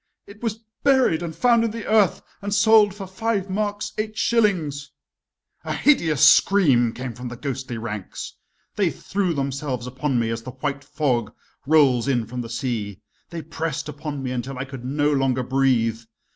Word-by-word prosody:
"It 200 +1 -14
was 225 -2 -2 0.2
buried 265 - +3
and 165 -2 -5
found 235 -2 +4
in 230 - +1
the 225 0 -6
earth 215 -4 +3 0.2
and 200 0 -4
sold 210 0 +5
for 200 -2 -7
five 195 0 -2
marks 205 +1 -2
eight 215 0 -3
shillings 165 -12 +1 0.4
" - - -66 0.3
A - - -3
hideous 160 - +3
scream 140 - +5
came 125 0 -6
from 125 +2 -7
the 120 0 -7
ghostly 130 -3 -4
ranks. 105 -4 -6 0.4
They - - +2
threw 185 -4 -2
themselves 135 -2 -3
upon 130 +1 -2
me 115 -1 0
as 115 0 -3
the 125 +2 -8
white 140 +1 -3
fog 135 -7 -1 0.3
rolls 140 -6 +4
in 120 -4 +1
from 125 +3 -5
the 115 - -7
sea, 115 -5 -3 0.3
they 170 -2 -6
pressed 160 -2 -4
upon 150 -2 -6
me 130 - -3
until 125 +1 -4
I 130 - -3
could 130 -2 -9
no 145 +3 +1
longer 130 -2 +1
breathe. 125 -4 +1
140 Hz, 175 wpm, -23 LUFS, 125-195 Hz, 0.4 s, sold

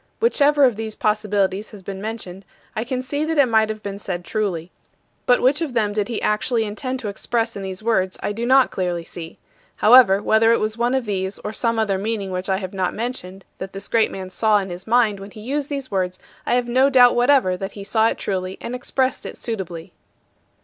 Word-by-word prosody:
Whichever 295 -10 +3
of 245 -5 +4
these 220 -1 -4
possibilities 210 -1 0
has 205 -3 -12
been 195 0 -6
mentioned 205 -4 -6 0.3
I 220 - -1
can 255 +1 -3
see 285 +3 -2
that 320 0 -1
it 285 - +6
might 220 -2 +2
have 215 0 -5
been 200 0 -5
said 180 -3 -5
truly. 185 -6 -2 0.6
But 245 - +4
which 275 +5 +3
of 290 -7 -3
them 210 -3 +1
he 210 0 +1
did 230 +1 -4
actually 225 +2 +1
intend 255 +5 -4
to 220 - -4
express 230 +3 -1
in 200 - -5
these 190 +1 -6
words 190 -5 +1
I - - -1
do 225 +3 -4
not 260 +2 +4
clearly 175 -2 -2
see. 165 0 -9 0.4
However, 215 -4 +7
whether 220 +2 +3
it 230 - +3
was 215 0 -1
one 240 +2 +1
of 260 -2 -1
these 190 -1 -2
or 210 - -4
some 230 0 0
other 205 -4 +1
meaning 205 -2 -3
which 185 +1 -3
I 190 - +2
have 185 -1 -6
not 185 -2 -1
mentioned 195 -5 -5
that 190 0 -6
this 195 +1 -7
great 225 -2 +2
man 185 -1 -7
saw 215 +1 +3
in 195 -2 -3
his 175 +3 -8
mind 225 -3 +3
when 195 +1 -9
he 215 - -12
used 280 +5 -2
these 275 -4 -4
words 185 -2 -1 0.3
I - - +3
have 245 -1 0
no 260 +3 +4
doubt 250 -3 +6
whatever 245 -6 +3
that 195 +1 -5
he 200 - -8
saw 220 +2 +2
it - - -1
truly 185 -1 -3
and 240 - -6
expressed 255 +1 -1
it - - -9
suitably. 185 -8 -5
215 Hz, 225 wpm, -21 LUFS, 195-245 Hz, 0.6 s, However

